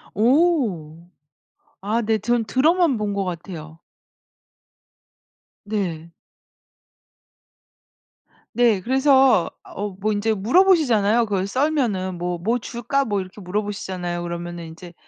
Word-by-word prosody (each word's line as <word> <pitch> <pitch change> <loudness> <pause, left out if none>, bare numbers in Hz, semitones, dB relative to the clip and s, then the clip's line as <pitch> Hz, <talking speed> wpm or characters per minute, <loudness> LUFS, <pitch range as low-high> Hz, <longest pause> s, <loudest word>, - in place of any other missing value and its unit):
오. 230 - +1 0.8
아 210 +4 -1
네. 220 0 +1
저는 235 +2 0
들어만 305 - +2
본 210 -1 -2
것 200 -1 -1
같아요. 165 -3 -7 1.9
네. 180 -6 -3 2.5
네. 235 -5 +3
그래서 265 - +4
어 205 +2 -5
뭐 215 +2 0
인제 215 +2 0
물어보시잖아요. 235 - +3
그걸 195 -3 -1
썰면은 225 - -1
"뭐 175 0 -3
뭐 225 +8 0
줄까?" 240 +4 -2
뭐 205 -4 -1
이렇게 185 +2 -11
물어보시잖아요. 185 -3 -4
그러면은 175 0 -6
인제 170 +2 -11
210 Hz, 220 characters per minute, -22 LUFS, 180-245 Hz, 2.5 s, 그래서